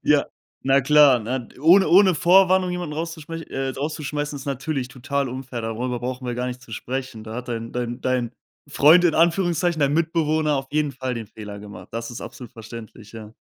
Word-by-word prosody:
Ja, - - +3 0.4
na 135 +1 +4
klar, 145 -2 +6
ne, 120 +2 -4
ohne 180 +5 +6
ohne 190 0 +6
Vorwarnung 185 +2 +4
jemanden 175 -4 -4
rauszuschmeiß 165 0 -5
äh, 135 -2 -4
rauszuschmeißen, 145 0 -3
ist 135 - -8
natürlich 135 -1 -3
total 140 +2 -2
unfair, 130 -2 -6
darüber 120 +2 -3
brauchen 125 +1 -4
wir 120 - -2
gar 125 +1 -2
nicht 125 0 -5
zu 115 - -13
sprechen. 125 -1 -5
Da 110 0 -7
hat 125 0 -6
dein 115 -1 -4
dein 120 0 -3
dein 125 -2 -1 0.4
„Freund“ 160 +6 +6
in 165 - +3
Anführungszeichen, 170 0 +2
dein 140 0 +3
Mitbewohner 155 -2 +1
auf 135 0 -3
jeden 150 -2 0
Fall 130 0 -4
den 115 -2 -6
Fehler 105 -1 -9
gemacht. 105 0 -11
Das 115 +1 -4
ist 120 - -7
absolut 125 0 -9
verständlich, 115 -2 -11
ja. 110 -1 -10
135 Hz, 190 wpm, -23 LUFS, 120-155 Hz, 0.4 s, klar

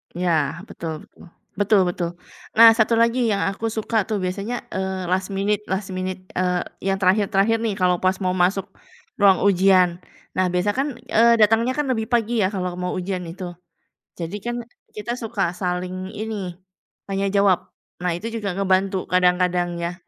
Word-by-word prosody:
Iya, 175 0 0 0.4
betul 165 -1 -5 0.2
betul. - - -17 0.3
Betul 205 0 +4
betul. 175 -1 -2 0.4
Nah, 230 +1 +9
satu 225 0 +3
lagi 230 +2 +3
yang 200 - -1
aku 200 +3 -5
suka 220 -1 0
tuh 215 -3 -1
biasanya, 200 +6 -3
eee, 190 -1 -3
last 190 +1 -1
minute 205 +2 0
last 190 +1 -2
minute, 185 0 -4 0.2
eee, 180 -1 +1 0.2
yang 195 0 +1
terakhir-terakhir 200 +3 +3
nih 215 - 0
kalau 180 -2 +2
pas 185 +1 +2
mau 185 - +1
masuk 195 +1 0 0.5
ruang 200 -2 +5
ujian. 185 -2 +4 0.4
Nah 185 - +3
biasanya 180 +3 +1
kan, 275 +2 +1 0.2
eee, 235 +1 +5
datangnya 225 +4 +4
kan 295 -1 -2
lebih 225 -4 0
pagi 230 -2 +2
ya - - +3
kalau 180 -2 -3
mau 180 0 -2
ujian 185 -1 -3
itu. 175 +1 -7 0.6
Jadi 170 +3 -5
kan 240 +3 -3 0.3
kita 215 +3 -5
suka 220 -7 -2
saling 180 0 -3
ini, 205 -5 -4 0.5
tanya 195 0 -1
jawab. 200 -2 +2 0.3
Nah, 180 -1 0
itu 225 +5 -6
juga 200 -5 -3
ngebantu 190 -1 +1
kadang-kadang 180 -1 +2
ya. 170 +1 -3
195 Hz, 165 wpm, -22 LUFS, 180-210 Hz, 0.6 s, Nah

